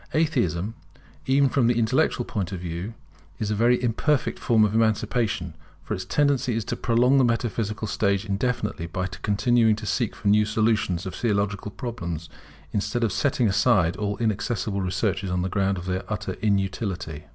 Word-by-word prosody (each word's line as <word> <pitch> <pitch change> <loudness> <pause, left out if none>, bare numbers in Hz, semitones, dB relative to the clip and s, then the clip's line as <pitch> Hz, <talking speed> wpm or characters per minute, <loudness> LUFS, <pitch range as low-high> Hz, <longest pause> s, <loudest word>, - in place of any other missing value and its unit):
Atheism, 105 - +1 0.5
even 135 +1 +4
from 130 -3 +2
the 120 -1 +2
intellectual 110 -2 +1
point 100 -2 -3
of 95 - -4
view, 90 +5 -5 0.4
is 105 +3 -2
a - - +1
very 120 +3 +3
imperfect 125 +5 0
form 110 -2 +3
of 105 - -1
emancipation; 110 -4 0 0.3
for - - -4
its 95 - -4
tendency 140 0 +1
is 115 -2 -2
to - - -2
prolong 125 +3 +3
the - - +5
metaphysical 115 -2 -1
stage 100 0 0
indefinitely, 105 -4 -2
by 95 +2 -3
continuing 105 - +2
to 105 +1 -7
seek 115 +1 -1
for 100 - -5
new 105 +1 +5
solutions 105 -4 0
of 95 - -5
Theological 105 -1 -1
problems, 85 - -5 0.4
instead 105 +4 -1
of 110 - +1
setting 125 +1 +1
aside 95 -4 +3
all 105 -1 -2
inaccessible 110 -2 -1
researches 95 +1 -1
on 90 0 0
the 95 - -1
ground 100 0 0
of 90 - -6
their 95 0 -2
utter - - -3
inutility. 95 -6 -1
105 Hz, 170 wpm, -25 LUFS, 95-115 Hz, 0.5 s, the